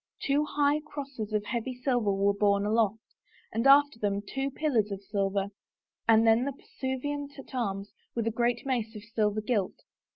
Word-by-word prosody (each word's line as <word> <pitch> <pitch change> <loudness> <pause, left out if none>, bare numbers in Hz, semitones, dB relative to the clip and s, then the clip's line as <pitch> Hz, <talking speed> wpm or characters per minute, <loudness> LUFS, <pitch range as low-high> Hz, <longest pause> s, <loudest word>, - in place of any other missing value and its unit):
Two 290 +2 +1
hij;h 290 +1 +3
crosses 270 -8 -6
of 210 -1 0
heavy 245 +3 -3
silver 245 -4 +1
were 200 +1 +2
borne 200 0 +2
aloft, 220 0 +1 0.5
and 230 +4 +2
after 285 -3 +6
them 205 -1 -1
two 270 +6 -2
pillars 265 -7 +1
of 200 0 -5
silver, 200 0 -1 0.6
and 225 0 +6
then 225 +2 +5
the 280 +1 -2
pursuivant 285 +2 -4
at 275 - -11
arms 200 -4 -2 0.2
with 230 -2 -1
a 230 - +1
great 235 +2 0
mace 235 -4 -1
of 210 - -8
silver 215 -2 0
gilt. 210 -4 -1
230 Hz, 170 wpm, -29 LUFS, 205-270 Hz, 0.6 s, after